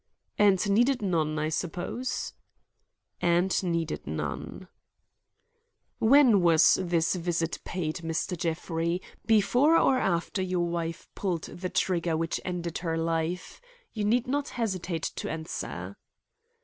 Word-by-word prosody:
"And 205 -1 +4
needed 245 +3 +3
none, 160 -5 0
I 155 0 0
suppose." 180 +9 -3 0.9
"And 175 +2 +2
needed 170 -3 -2
none." - - -5 1.3
"When 235 -4 +6
was 165 -2 +5
this 170 -2 +1
visit 170 -2 -1
paid, 165 -3 -3
Mr. 165 +2 -2
Jeffrey? 170 +1 -1 0.3
Before 245 +9 +4
or 260 -4 +4
after 190 -1 0
your 180 -2 0
wife 170 -1 -3
pulled 180 -5 -2
the 185 +1 -5
trigger 170 -4 0
which 165 +1 -2
ended 175 -2 -3
her 165 -2 -2
life? 165 - -2 0.3
You 215 - -2
need 230 +4 +2
not 285 +2 -1
hesitate 185 -8 -3
to - - -3
answer." 160 0 -5
175 Hz, 120 wpm, -28 LUFS, 165-200 Hz, 1.3 s, When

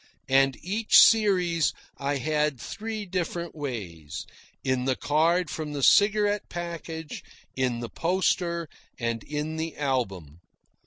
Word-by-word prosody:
And 135 0 +4
each 210 +5 +3
series 180 -7 +5 0.3
I 140 +1 -1
had 150 0 0
three 220 - -5
different 175 -2 -3
ways: 90 - -6 0.4
in 130 -1 0
the 130 -1 +1
card 160 +4 +1
from 155 -2 -4
the 140 -2 -3
cigarette 205 +2 +4
package, 165 -2 -6 0.3
in 125 -2 0
the 120 - -5
poster, 170 0 0 0.3
and 115 -1 -2
in 150 +1 -4
the 160 -1 -4
album. 95 - -2
155 Hz, 120 wpm, -27 LUFS, 130-175 Hz, 0.4 s, series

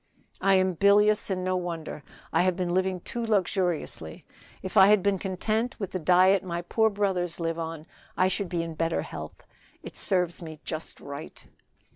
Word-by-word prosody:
"I 195 0 +4
am 185 0 +2
bilious, 205 +4 +4
and 185 -1 -1
no 185 0 0
wonder. 170 -4 -4 0.3
I - - +4
have 185 0 +2
been 180 -1 -2
living 185 -1 0
too 235 +6 -5
luxuriously; 180 - -1 0.4
if 190 - -6
I 190 -2 +8
had 210 -2 +5
been 200 -2 +1
content 215 +6 -2
with 195 -4 -4
the 185 - -3
diet 185 +3 +4
my 175 -1 -4
poor 220 +5 +2
brothers 190 -4 -1
live 165 0 -2
on, 165 -1 -5 0.3
I 185 - +4
should 190 0 -2
be 170 -2 -1
in 165 -1 -5
better 165 +1 -1
health. - - -9 0.4
It - - -9
serves 180 -3 +1
me 160 -2 -8
just 160 0 -6
right." 140 +2 -9
185 Hz, 180 wpm, -27 LUFS, 170-195 Hz, 0.4 s, I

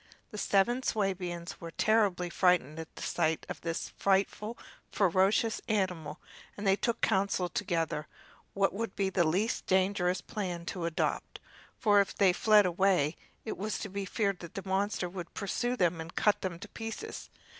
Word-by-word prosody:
The 210 - -7
seven 220 +7 +2
Swabians 185 -6 -2
were 170 - -6
terribly 195 -2 +2
frightened 170 -5 +2
at 160 - -8
the - - -7
sight 160 -2 0
of - - -6
this 165 0 -3
frightful, 200 +3 0 0.3
ferocious 195 +4 +2
animal, 180 -8 -1 0.4
and 205 - -5
they 195 0 +5
took 235 +4 -1
counsel 190 -3 +1
together 165 -5 -1 0.5
what 195 0 +2
would 220 0 -4
be 195 -1 0
the 180 -1 +3
least 185 +8 0
dangerous 185 -1 +2
plan 180 -5 -4
to 175 -1 -3
adopt, 170 -1 -2 0.4
for 205 -3 +5
if 195 - -3
they 190 -3 +4
fled 210 +1 +5
away 180 -4 +2 0.3
it 220 - -4
was 210 +2 -2
to 205 - -5
be 200 +1 -4
feared 200 -1 0
that 170 - -10
the 195 0 -6
monster 190 -1 0
would 175 -1 -8
pursue 240 +5 -1
them 175 -4 +1
and 165 +1 -9
cut 210 -1 +3
them 180 -3 -3
to - - -9
pieces. 225 - -6
190 Hz, 165 wpm, -31 LUFS, 175-205 Hz, 0.5 s, they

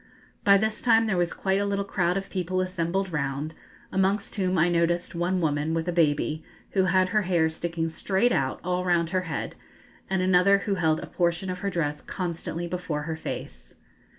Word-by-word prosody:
By 200 0 +7
this 220 +2 -1
time 225 -2 +4
there 215 -4 0
was 175 -1 +1
quite 195 0 0
a - - 0
little 200 0 -1
crowd 180 -2 0
of 195 0 -5
people 185 0 -1
assembled 185 +1 -1
round, 140 +1 -2 0.4
amongst 195 +2 +1
whom 185 -3 0
I 170 +1 +4
noticed 170 0 +1
one 180 +2 0
woman 155 0 0
with 165 +1 -2
a - - +1
baby, 155 -2 +1 0.3
who 190 -2 +2
had 185 0 +3
her 215 +2 +2
hair 170 -4 +2
sticking 165 0 -2
straight 195 +8 +1
out 130 - 0
all 180 0 -1
round 170 -2 +1
her 185 -1 +1
head, 150 - -3 0.6
and 190 -1 +1
another 185 +2 +5
who 205 - +1
held 160 -4 +1
a - - -5
portion 175 +1 -1
of 180 - -5
her 200 - -1
dress 150 -5 -2
constantly 170 -2 -4
before 170 -4 -3
her 160 +1 -3
face. 160 - -7
180 Hz, 195 wpm, -26 LUFS, 165-190 Hz, 0.6 s, By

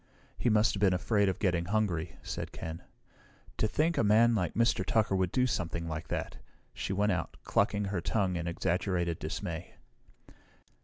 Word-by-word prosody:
"He 120 - +1
must 110 0 +4
have 100 - -4
been 95 -3 +4
afraid 100 +2 +2
of 95 - -2
getting 90 -4 +1
hungry," 90 -5 -1
said - - -5
Ken. 80 +1 -6 0.8
"To 110 - +2
think 160 +9 +1
a - - +3
man 115 +3 +5
like 90 -8 -1
Mr. 115 +1 +2
Tucker 110 -3 +1
would 95 -2 +1
do 125 - +2
something 85 -7 -2
like 80 -1 -4
that!" - - -4 0.4
She - - -4
went 105 +2 +2
out, 90 -2 -3
clucking 100 0 +1
her 95 -3 -2
tongue 95 -1 0
in 85 0 -3
exaggerated 85 0 -1
dismay. 80 +2 -5
95 Hz, 170 wpm, -31 LUFS, 85-105 Hz, 0.8 s, man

